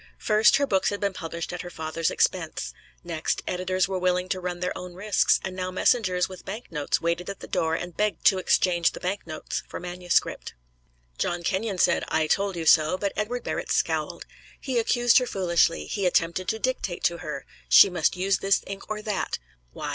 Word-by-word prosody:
First, 215 +1 +4
her 280 - +2
books 190 -7 +1
had 205 - -3
been 200 -1 -1
published 170 -1 -5
at 180 - -4
her 175 - -7
father's 160 0 -2
expense; 60 0 -1 0.3
next, 165 -2 -2
editors 185 0 0
were 190 -1 -2
willing 180 0 0
to 190 - -1
run 180 -1 -4
their 180 0 -2
own 180 -1 -8
risks, 205 +1 +2
and 190 -1 -4
now 185 0 -3
messengers 185 -1 +2
with 185 -1 -11
bank 215 +5 -7
notes 150 -3 -1
waited 170 +2 -1
at 200 - -6
the - - -8
door 160 0 0
and 175 0 -5
begged 210 -1 -1
to 190 - +5
exchange 175 -2 +2
the - - -8
bank 185 0 -3
notes 155 -1 -4
for - - -7
manuscript. 175 - -1 0.6
John 175 0 -1
Kenyon 195 +3 -1
said, - - +3
"I 160 0 +1
told 195 +4 0
you 165 -1 -4
so," 160 +3 +5
but 200 0 -2
Edward 240 +4 -2
Barrett - - -3
scowled. - - -1 0.3
He 255 -3 -1
accused 240 +1 +4
her 250 - -2
foolishly; 170 -4 +1
he 200 -4 -1
attempted 175 +1 +1
to 220 - 0
dictate 220 -7 -2
to 170 -1 +1
her 150 -5 -6 0.2
she - - +9
must 175 0 +1
use 190 +1 +1
this 195 0 +2
ink 195 0 -8
or 215 0 -4
that. 210 -2 -2 0.3
Why? - - -5
185 Hz, 200 wpm, -26 LUFS, 170-200 Hz, 0.6 s, she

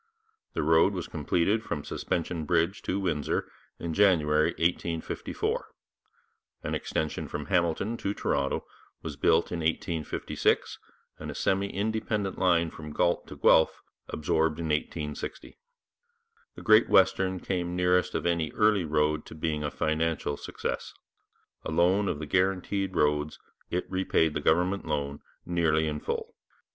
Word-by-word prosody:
The - - -1
road 80 +5 +4
was 90 -3 -4
completed 85 +7 +1
from 75 -10 -4
Suspension 85 -1 -2
Bridge 85 +4 +1
to 95 - -1
Windsor 80 -7 -1 0.3
in 85 -1 -4
January 80 -6 +4
1854. 85 -1 -2 1.0
An - - -3
extension 80 - -2
from 75 -1 -5
Hamilton 90 +6 0
to 100 -1 -2
Toronto 70 -1 -1 0.4
was 80 -3 -5
built 80 +3 +2
in 85 - -2
1856, 80 -1 -1 0.4
and - - -6
a - - -6
semi 95 +1 +1
independent 105 -1 -2
line 85 -3 +3
from 75 -1 -9
Galt 85 +3 +1
to - - -9
Guelph 80 - +4 0.3
absorbed 80 +1 0
in 85 -1 -3
1860. 75 - -4 1.0
The - - -9
Great 110 0 +6
Western 95 -1 +3
came 90 -2 -2
nearest 90 0 +2
of - - -1
any 85 -3 +1
early 105 -4 +3
road 75 0 +1
to - - -10
being 75 -1 -2
a 75 - -1
financial 80 -1 -1
success; - - -5 0.7
alone 90 +5 +2
of 75 - -1
the 75 - -5
guaranteed 95 +3 0
roads 75 0 +1 0.3
it 90 +1 -1
repaid 95 -4 +1
the 75 - -2
government 90 +6 +2
loan, 70 -1 -2 0.3
nearly 80 -3 +2
in 75 -1 -2
full. - - -4
85 Hz, 135 wpm, -28 LUFS, 75-95 Hz, 1.0 s, Great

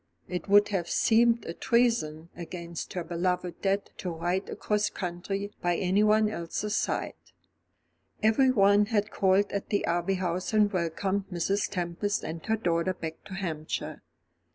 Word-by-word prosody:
It 180 +2 -4
would 205 +1 +6
have 185 -4 -2
seemed 230 +1 +3
a 165 - -4
treason 225 -10 +1
against 170 -1 -6
her 180 - -3
beloved 175 +1 -2
dead 195 +1 0
to 180 - -4
ride 175 +3 -2
across 210 0 0
country 195 +3 -4
by 175 0 +1
anyone 210 +4 +3
else's 210 +2 -3
side. - - -1 1.1
Everyone 215 -3 +4
had 210 -2 0
called 195 +1 +2
at 200 - -3
the 205 - +1
Abbey 175 +3 0
House 180 +2 -2
and 210 -1 +3
welcomed 190 +3 -1
Mrs. 195 +4 0
Tempest 185 +2 -2
and 160 +1 -5
her 220 0 +2
daughter 175 -2 0
back 160 -1 -7
to 190 - -7
Hampshire. 160 -5 -4
190 Hz, 145 wpm, -28 LUFS, 170-205 Hz, 1.1 s, would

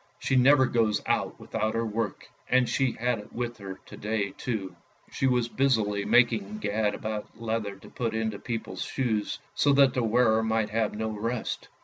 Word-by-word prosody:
She 130 - 0
never 130 +1 +6
goes 110 -4 +2
out - - 0
without 110 0 -2
her 115 0 0
work, 110 -2 -3 0.2
and 125 -1 +4
she 135 -3 +1
had 120 -1 -1
it 105 - -12
with 120 -1 -3
her 95 -1 -7
to - - -11
day 105 -2 -2
too. 105 -6 -4 0.4
She 135 - 0
was 125 -2 +2
busily 110 -7 +1
making 110 -4 +3
gad 105 0 0
about 110 0 -5
leather 110 -3 -2
to 95 - -15
put 115 -2 -3
into 110 -2 -2
people's 115 -2 -5
shoes, 110 -6 -1 0.2
so 145 - +3
that 135 -2 +5
the 125 - 0
wearer 115 -1 +3
might 110 -1 0
have 110 -1 0
no 110 +1 -2
rest. 110 +2 -3
110 Hz, 180 wpm, -28 LUFS, 105-120 Hz, 0.4 s, never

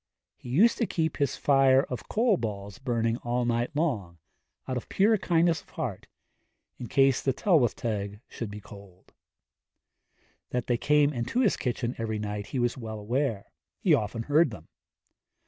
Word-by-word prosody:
He 125 - -11
used 200 - +4
to 230 - +1
keep 160 -1 -1
his 140 -2 0
fire 135 -1 +4
of 125 - -7
coal 225 -1 +3
balls 105 - -5
burning 115 -3 0
all 120 0 -1
night 120 0 0
long, 110 - -1 0.5
out 130 - -2
of 125 - -5
pure 210 +3 +4
kindness 170 -3 +2
of - - -26
heart, - - -5 0.7
in 120 - -6
case 135 0 +3
the 135 - +1
Tylwyth 145 - +2
Teg 105 -3 -3
should 115 - -6
be 105 +1 -7
cold. 100 -3 -15 1.4
That 125 -2 -2
they 120 - +1
came 150 +2 +3
into 125 - -1
his 220 - +3
kitchen 120 -1 -2
every 110 -1 -2
night 105 -1 -4
he - - -4
was 120 -1 +1
well 110 -3 -6
aware; 115 -1 -2 0.3
he - - +3
often 115 +2 0
heard 150 +4 +3
them. 85 -8 -11
120 Hz, 165 wpm, -28 LUFS, 110-145 Hz, 1.4 s, used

